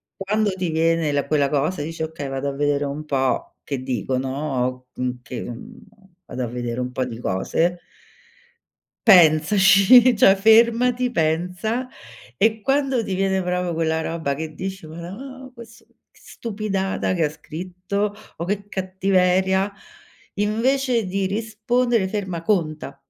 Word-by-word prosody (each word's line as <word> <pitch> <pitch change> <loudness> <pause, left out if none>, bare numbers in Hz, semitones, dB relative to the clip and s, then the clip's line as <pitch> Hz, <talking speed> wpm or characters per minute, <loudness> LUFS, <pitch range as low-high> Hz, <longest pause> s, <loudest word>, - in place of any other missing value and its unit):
quando 210 +1 0
ti 185 -2 -3
viene 165 -1 +1
la 145 0 0
quella 145 -2 +2
cosa 150 +3 0
e - - -3
dici: 165 0 -7
"Okay, 155 -3 -5
vado 135 +1 -3
a 140 - -4
vedere 145 0 0
un 145 +2 -4
po' 135 -3 -1
che 135 -3 -4
dicono, 130 0 -2
m 125 0 -1
che 125 0 -7
mhmm, 220 - -9 0.5
vado 125 - -5
a - - -2
vedere 120 0 -4
un 125 0 -3
po' 130 - -1
di 115 -2 -7
cose." 165 - 0 1.3
Pensaci, 195 +7 +6
cioè 195 -2 +6
fermati, 235 +4 +4
pensa, 180 +8 -1 0.5
e 220 +1 +2
quando 270 0 +1
ti 190 -3 -3
viene 190 0 0
proprio 180 -1 -1
quella 160 0 0
roba 160 -4 -2
che 155 +2 -6
dici: 190 -3 -6
"Marò 255 - -9
ques 235 -2 -14 0.3
che - - -25
stupidata 200 -4 -3
che 165 -4 +1
scritto," 180 +6 -4 0.2
o: 170 - -4
"Che 205 +2 -3
cattiveria," 190 0 +1 0.7
invece 235 +3 +1
di 195 +1 -1
rispondere 225 +2 0
ferma, 190 -4 -4
conta. 155 -7 -1
180 Hz, 140 wpm, -22 LUFS, 150-210 Hz, 1.3 s, Pensaci